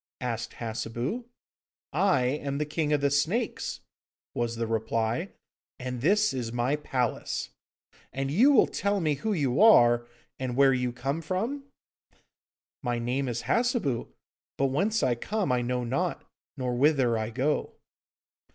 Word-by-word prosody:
asked - - -3
Hassebu. 120 - -4 0.7
'I 190 -9 +3
am 140 +1 -2
the 150 - 0
King 150 0 -1
of 150 -2 +2
the 140 0 +2
Snakes,' 175 - -1 0.5
was 120 -1 -1
the 115 0 -2
reply, 115 - -1 0.5
'and 125 -1 -5
this 210 +6 +3
is 120 -3 -3
my 120 +4 +1
palace. 130 -5 -2 0.6
And 135 +1 -2
will - - -2
you 265 +7 +6
tell 200 0 -1
me 155 -4 +1
who 180 +10 -2
you 145 -5 +1
are, 120 - +6 0.3
and 130 -2 -3
where 135 0 +5
you 125 -1 0
come 135 +6 -3
from?' 225 - -3 1.2
'My 120 -3 -1
name 125 +3 -1
is 120 0 -3
Hassebu, 230 - 0 0.5
but 135 - +2
whence 210 +10 +1
I 125 - +3
come 200 - -2
I 125 -1 +2
know 125 +1 -1
not, 160 +9 -2 0.3
nor 125 -2 -1
whither 130 -2 +3
I 110 0 -2
go. 135 +6 -1
135 Hz, 145 wpm, -28 LUFS, 120-170 Hz, 1.2 s, you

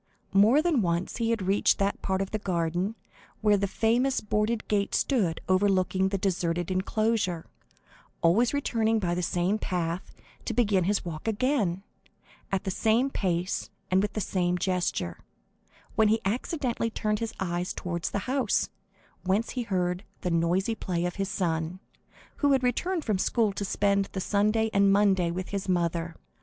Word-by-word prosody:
More 220 +10 +5
than 325 -8 +2
once 170 -1 -1
he 230 -1 0
had 230 -4 0
reached 195 +2 +3
that 200 0 -1
part 190 0 0
of 195 - -8
the 215 - -1
garden 180 +2 -1 0.5
where 210 -1 +4
the 200 0 0
famous 240 +6 +1
boarded 210 +2 -1
gate 205 -1 0
stood 200 - +1
overlooking 190 0 +2
the 195 - -1
deserted 175 -2 -1
enclosure, 190 -2 0 0.8
always 210 +9 +4
returning 225 -6 +1
by 180 -5 0
the 180 - -1
same 180 +4 0
path, 175 -2 -2 0.3
to 230 - -2
begin 205 -7 +3
his 200 0 0
walk 160 +2 -6
again, 215 -5 0 0.7
at 195 -1 0
the 190 - -2
same 230 +7 +2
pace 180 -3 -1 0.2
and 185 +1 +4
with 205 0 -2
the 215 - -2
same 180 -1 0
gesture, 180 - -1 0.7
when 220 - +4
he 220 +2 +3
accidentally 240 - -1
turned 215 -2 -1
his 230 -1 -4
eyes 175 -1 -2
towards 170 -1 -3
the 200 - -3
house, 260 -4 +1 0.5
whence 195 +5 0
he 250 - -2
heard 180 -4 -1 0.2
the 180 - -1
noisy 175 +6 +1
play 175 -5 -2
of 180 - -3
his 195 -1 -1
son, 170 -2 -2 0.6
who 285 -1 +3
had 265 -1 +2
returned 330 +8 0
from 210 -4 0
school 220 0 +1
to 200 - -3
spend 200 0 +1
the 190 - -2
Sunday 215 +3 +1
and 200 0 +4
Monday 195 -3 +3
with 185 +2 -4
his 200 -1 -3
mother. 170 -2 0
195 Hz, 165 wpm, -28 LUFS, 180-220 Hz, 0.8 s, More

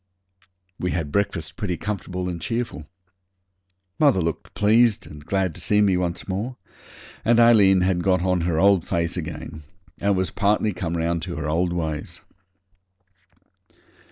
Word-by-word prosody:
We 90 - -1
had 80 -4 -3
breakfast 95 -3 -2
pretty 90 -6 -2
comfortable 90 -3 -4
and 85 -2 -4
cheerful. 115 -9 -3 1.1
Mother 140 -10 +4
looked 85 -2 -3
pleased 110 +1 +3
and 75 -1 -11
glad 95 0 -1
to - - -9
see 105 - +2
me 100 -3 +4
once 90 -1 -2
more, 105 +7 -3 0.7
and 120 +1 +4
Aileen 105 -5 +6
had 90 -1 +1
got 90 -1 +2
on 90 -1 +1
her 85 -1 0
old 100 -2 +4
face 85 0 -1
again, 80 -2 -6 0.4
and 100 -1 +1
was 95 0 -1
partly 105 +1 +1
come 85 -1 -3
round 85 0 -1
to 90 0 -5
her 75 -1 -4
old 85 +3 0
ways. 80 -3 -4
90 Hz, 150 wpm, -23 LUFS, 85-100 Hz, 1.1 s, Aileen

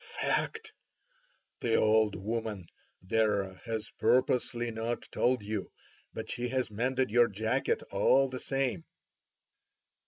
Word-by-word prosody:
"Fact! 445 -1 -2 0.9
The 115 -2 +1
old 110 -1 +3
woman 110 -2 -3 0.4
there 100 -1 +1
has 110 -2 -4
purposely 120 -1 +2
not 115 +1 -3
told 125 -3 +1
you, 105 +1 -4 0.4
but - - -6
she 120 0 -2
has 130 -3 -1
mended 125 +3 0
your 120 +1 +5
jacket 110 +2 -1
all 135 0 +4
the 130 -1 -5
same." 135 +5 -1
115 Hz, 115 wpm, -30 LUFS, 110-130 Hz, 0.9 s, your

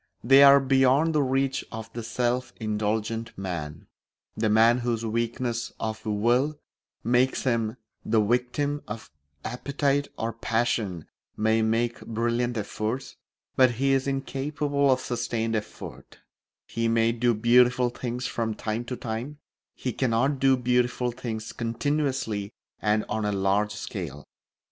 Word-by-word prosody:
They 135 +4 +7
are 140 0 +9
beyond 135 +4 +3
the 150 - +3
reach 135 0 0
of 110 0 -7
the 120 - -4
self 120 +2 -1
indulgent 110 +1 -2
man. 85 -6 -5 0.5
The 110 0 0
man 115 +3 +5
whose 120 -2 -1
weakness 115 +1 -2
of 110 -1 -4
will 120 +8 +2 0.5
makes 125 +3 +2
him 115 -2 0 0.3
the 110 0 +2
victim 125 +6 0
of 105 -4 -7 0.3
appetite 140 +3 0
or 115 +1 -2
passion 115 -7 -1 0.3
may 110 +1 +2
make 115 +2 0
brilliant 120 +1 -1
efforts, 110 +5 -3 0.4
but 130 -2 +5
he 135 +4 +1
is 135 0 +1
incapable 140 +1 0
of 130 -1 +3
sustained 115 -2 -2
effort; 105 -1 -7 0.5
he 115 0 -2
may 115 0 +3
do 120 0 +1
beautiful 125 +2 +4
things 125 +1 -4
from 115 -3 -2
time 110 +2 -3
to 125 - -4
time, 120 +6 -5 0.4
he 125 - -3
cannot 130 +3 +1
do 135 0 +4
beautiful 125 0 +1
things 115 -3 -5
continuously 120 -4 -1 0.3
and 105 0 +1
on 110 - -2
a 105 - 0
large 100 +2 +1
scale. 75 -8 -6
120 Hz, 135 wpm, -26 LUFS, 110-130 Hz, 0.5 s, are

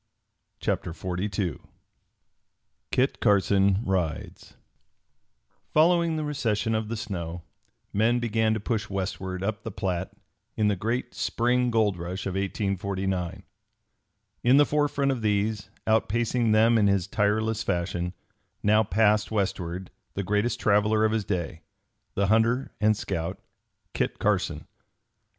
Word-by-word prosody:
CHAPTER 85 - -1
XLII 90 -1 -3 1.3
KIT 130 +2 +1
CARSON 100 -1 +3
RIDES 90 -5 -3 1.1
Following 170 +1 +3
the 155 - -2
recession 115 -7 -1
of 110 0 -1
the 115 +1 -3
snow, 90 -6 -5 0.5
men 115 +4 +3
began 110 -2 +1
to - - -2
push 110 +1 -2
westward 95 -1 -3
up 110 +2 -2
the 115 - -5
Platte 95 -3 -2 0.5
in 105 -1 +3
the 105 - +1
great 115 +6 -2
spring 125 +1 +1
gold 110 -5 +2
rush 90 +2 -5
of 95 - -2
1849. 95 -2 -2 1.0
In 125 +3 +6
the 145 - +7
forefront 145 -2 +1
of 130 -3 -2
these, 105 0 0 0.2
outpacing 115 +1 +1
them 115 +2 +5
in 105 - +4
his 100 -2 +2
tireless 105 +2 0
fashion, 90 0 -2 0.5
now 105 +1 +5
passed 105 +1 +2
westward 95 -3 -2 0.2
the 100 - -1
greatest 105 +5 0
traveler 105 +1 +3
of 110 - +2
his 110 -2 -1
day, 85 -4 -3 0.5
the 100 - +2
hunter 115 +5 +2
and 110 0 +4
scout, 85 +1 -3 0.5
Kit - - -1
Carson. - - 0
105 Hz, 125 wpm, -26 LUFS, 95-115 Hz, 1.3 s, the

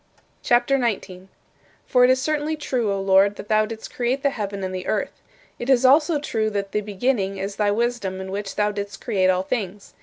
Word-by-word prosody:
CHAPTER 245 +3 +3
XIX 235 -5 0
28. 185 0 -13 0.6
For 250 -2 +4
it 250 - +6
is 260 0 +4
certainly 305 +2 -1
true, 255 -8 -1
O 195 - -1
Lord, 195 +1 +4
that 205 - -10
thou 215 0 +3
didst 225 0 -8
create 250 +3 -1
the 280 - +3
heaven 200 -4 -4
and 185 0 -3
the 185 0 -5
earth. - - -2 0.4
It 240 - -4
is 260 -1 +4
also 300 +4 +5
true 220 -6 -1
that 200 -2 -3
"the 210 - 0
beginning" 205 -1 -1
is 195 +1 -5
thy 210 -1 +2
wisdom 215 -3 -1
in 190 0 -6
which 200 0 -4
thou 210 0 +1
didst 200 -1 -6
create 185 -2 +1
all 185 0 +2
things. 200 -2 -4
210 Hz, 215 wpm, -23 LUFS, 195-250 Hz, 0.6 s, it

